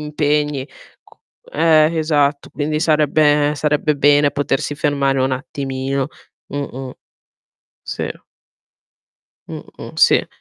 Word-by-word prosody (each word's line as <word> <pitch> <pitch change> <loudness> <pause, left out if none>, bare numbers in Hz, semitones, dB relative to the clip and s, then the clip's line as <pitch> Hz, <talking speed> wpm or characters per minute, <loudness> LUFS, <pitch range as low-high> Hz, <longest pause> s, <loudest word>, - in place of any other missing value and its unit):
impegni, 150 -2 -1 0.4
co - - -24 0.3
eh, 160 0 +3
esatto 145 -2 0
quindi 150 +1 -2
sarebbe 150 -2 +3
sarebbe 150 +1 +1
bene 145 +1 +4
potersi 145 0 -2
fermare 140 -2 0
un 130 0 +1
attimino. 135 +1 -3 0.4
Mh-mh. 135 -2 -5 0.9
Sì. - - -4 1.4
Mh-mh, - - -10
sì. - - +4
145 Hz, 90 wpm, -18 LUFS, 140-150 Hz, 1.4 s, bene